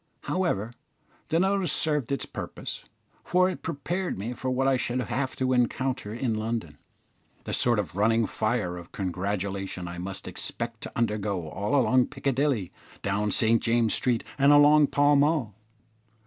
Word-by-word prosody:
However, 120 - -1 0.6
the 165 - +2
notice 190 -3 +1
served 150 -6 +1
its 140 - -1
purpose, - - -7 0.4
for 185 +1 +3
it 180 - -8
prepared 175 +4 -3
me 110 +6 -4
for 130 +2 -4
what 130 +1 +1
I 135 - +4
should 125 0 -1
have 130 +1 -2
to 130 0 0
encounter 125 -2 0
in 115 +1 -1
London 110 -9 -3 0.6
the - - -5
sort 120 -2 +3
of 100 -4 -3
running 115 +3 +3
fire 110 -7 -1
of 85 0 -11
congratulation 95 -2 -3
I 85 0 -6
must 95 +1 -5
expect 115 -1 -4
to - - -6
undergo 105 -6 -1
all 105 - 0
along 130 0 +3
Piccadilly, 135 - -1 0.3
down 100 +1 0
St 115 +2 +3
James's 115 -1 +2
Street, 120 -3 +1 0.2
and 140 +1 +6
along 145 0 +7
Pall 145 +1 +4
Mall. 145 -6 +2
120 Hz, 155 wpm, -27 LUFS, 105-140 Hz, 0.6 s, along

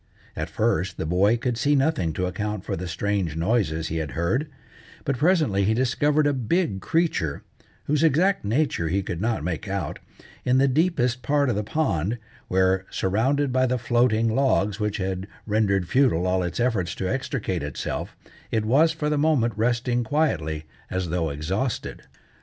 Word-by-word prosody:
At - - -3
first 90 +3 0
the - - -3
boy 95 +8 +3
could 120 -1 -2
see 145 +3 +3
nothing 135 - +1
to 90 - -1
account 105 +2 -3
for - - -2
the 90 +2 -5
strange 90 -1 -1
noises 80 -3 0
he 80 - -2
had 75 -4 -3
heard, 105 - 0 0.6
but 140 - 0
presently 155 - +3
he 110 +3 +2
discovered 145 +4 +2
a 145 - +3
big 130 - 0
creature, 155 - 0 0.4
whose 150 0 0
exact 165 +5 +3
nature 110 - 0
he 95 +3 0
could 85 -1 -4
not 110 -7 0
make 90 +2 -3
out, 100 0 -3 0.4
in 125 +1 +3
the 135 +1 +4
deepest 130 -4 +1
part 145 -2 +2
of - - -1
the 105 - -1
pond, 110 - -1 0.3
where, 95 0 +2
surrounded 130 +8 0
by 130 0 +3
the 125 +1 0
floating 120 -2 +2
logs 110 -6 +1
which 105 -1 -1
had 95 -1 -3 0.2
rendered 100 -4 +1
futile 120 -8 +3
all 95 0 +1
its 90 +3 -3
efforts 105 -9 0
to 95 - -3
extricate 125 -7 -2
itself, 70 0 -4 0.3
it 110 -1 0
was, 145 +8 +4
for 160 -2 -3
the 150 -1 +1
moment, 140 -7 +2
resting 120 +2 +1
quietly 95 - 0 0.3
as 95 -2 -2
though 80 -1 0
exhausted. 95 - -3
110 Hz, 170 wpm, -24 LUFS, 95-135 Hz, 0.6 s, the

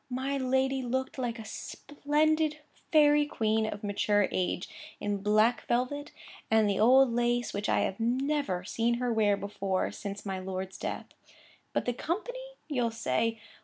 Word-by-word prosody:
My 265 +2 -2
lady 265 0 +1
looked 260 +2 -2
like 240 -2 -2
a 225 - -8
splendid 300 +5 0 0.3
fairy 295 -2 +5
queen 220 -4 0
of 210 0 -6
mature 205 0 +2
age, 180 0 -1 0.3
in 205 0 -1
black 215 +3 +2
velvet, 255 +5 -1 0.4
and 220 -1 +4
the 200 -2 0
old 250 +2 +6
lace, 240 0 +1
which 205 +1 -2
I - - +3
have 195 - -2
never 255 -4 0
seen 230 +4 0
her 245 0 -1
wear 210 -2 +3
before 195 -2 -2
since 200 0 -7
my 190 -1 -3
lord's 190 0 -5
death. - - -4 0.7
But - - -1
the 245 - 0
company? 430 - -3 0.3
you'll 250 -6 0
say. 225 - -1
235 Hz, 155 wpm, -29 LUFS, 205-270 Hz, 0.7 s, old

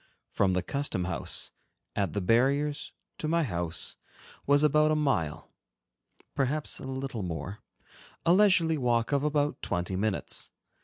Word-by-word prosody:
From 95 -2 +2
the 90 0 0
custom 140 -7 -2
house, 85 -2 0 0.4
at 100 -2 0
the 100 - -1
barriers, 140 +8 +2 0.3
to 155 - -2
my 165 +1 +2
house, 85 - -1 0.5
was 145 +1 +4
about 150 +1 +4
a 155 - +3
mile, 90 - -1 0.8
perhaps 145 +3 -1
a - - -7
little 130 -3 -4
more—a 95 - -4
leisurely 180 -6 +4
walk 120 -1 +1
of 140 -1 +2
about 150 -1 0
twenty 90 +2 -2
minutes. 100 +1 -1
135 Hz, 135 wpm, -29 LUFS, 95-150 Hz, 0.8 s, was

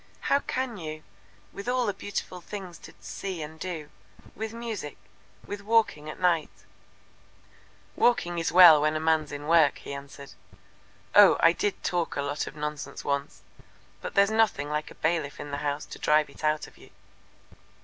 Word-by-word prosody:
"How 280 - +5
can 260 -5 -3
you, 155 -3 -7 0.5
with 200 +5 -5
all 250 -1 +1
the 205 - 0
beautiful 185 -3 -5
things 185 -2 -8
to - - -13
see 185 -5 -5
and 160 +1 -10
do 160 -5 -6 0.4
with 220 +1 -5
music 225 -9 -6 0.5
with 205 0 -6
walking 210 -8 +1
at - - -8
night 175 -3 0 0.6
" - - -30
"Walking 205 -8 +2
is 165 - -1
well 175 -3 +9
enough - - 0
when 155 +1 +1
a - - 0
man's 160 -1 +1
in 145 0 -6
work," 160 -3 +4
he - - -8
answered. 140 0 -10 0.8
"Oh, 205 -2 +8
I 165 - +6
did 200 +3 -2
talk 175 -2 -1
a 140 - -1
lot 145 +1 -3
of - - -8
nonsense 150 0 -5
once, 140 0 -3 0.6
but - - -6
there's 200 +1 +4
nothing 220 -10 +1
like 150 0 -2
a - - -13
bailiff 160 -3 -1
in 145 0 -7
the 140 - -2
house 145 0 -2
to - - -10
drive 150 0 +2
it - - -15
out 155 0 +1
of - - -17
you. - - -16
165 Hz, 180 wpm, -27 LUFS, 150-200 Hz, 0.8 s, well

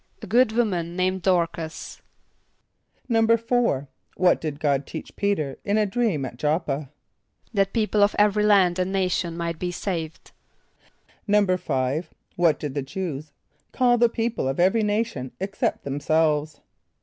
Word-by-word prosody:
=A - - -4
good 230 +3 +3
woman 180 -8 0
named 185 +1 0
Dôr´cas.= 170 -3 -1 1.1
=4.= 230 - +2 0.3
What 180 -1 +3
did 150 -3 -4
God 140 -3 0
teach 160 - -8
P[=e]´t[~e]r 190 -9 -1
in 205 +1 +1
a 215 - +3
dream 205 - 0
at 120 -1 -8
J[)o]p´p[.a]? 150 -1 -1 0.6
=That 195 -2 +2
people 215 -2 +1
of 205 +1 +4
every 210 0 +3
land 190 -4 +4
and 185 +1 0
nation 180 -3 -1
might 170 -1 -3
be 180 - -2
saved.= 170 -2 -5 1.0
=5.= 180 -8 +1 0.3
What 170 -4 +3
did 145 -3 -4
the 140 - -2
Jew[s+] 150 0 -5 0.4
call 245 -2 +3
the 235 0 +5
people 230 - -2
of 135 +3 -2
every 190 +6 +4
nation 210 - -1
except 195 +1 -2
themselves? 150 +2 0
180 Hz, 135 wpm, -24 LUFS, 155-210 Hz, 1.1 s, the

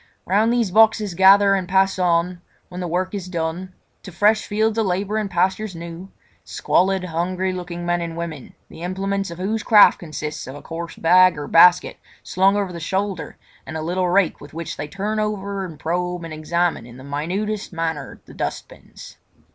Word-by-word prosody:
Round 210 +5 +2
these 235 -5 +1
boxes 215 -1 +4
gather 195 +2 +6
and 190 -2 -1
pass 190 0 +2
on, 175 0 +1 0.3
when 180 - -8
the 180 - -3
work 180 +3 -2
is 195 -3 -5
done, 170 +2 -3 0.3
to 190 - -10
fresh 210 +5 +2
fields 220 +1 0
of 220 - +1
labour 195 +4 -1
and 215 -2 -2
pastures 190 +2 0
new, 170 +3 -9 0.3
squalid 190 +1 +1
hungry 180 +2 -2
looking 175 -1 -6
men 175 0 0
and 165 -1 -5
women, 160 -5 -7
the - - -13
implements 195 +2 -2
of 170 - -8
whose 210 +4 -2
craft 210 -1 +6
consist 155 -2 -6
of 130 - -8
a 145 - -10
coarse 165 +1 -7
bag 185 0 +5
or 145 -1 -5
basket 175 +3 +5 0.3
slung 190 +2 +2
over 195 -3 -2
the 170 - -6
shoulder 190 -1 -3 0.3
and 160 - -6
a 155 - -4
little 180 +2 -1
rake 185 -1 +2
with 145 +1 -13
which 165 0 -5
they 150 - -5
turn 205 +5 -3
over 200 -2 -3
and 165 -5 -10
probe 180 +1 -2
and 165 -1 -7
examine 170 -2 -1
in 120 0 -13
the 130 - -12
minutest 185 +10 -3
manner 160 -5 -4
the - - -14
dustbins. - - -7
180 Hz, 185 wpm, -21 LUFS, 170-195 Hz, 0.3 s, gather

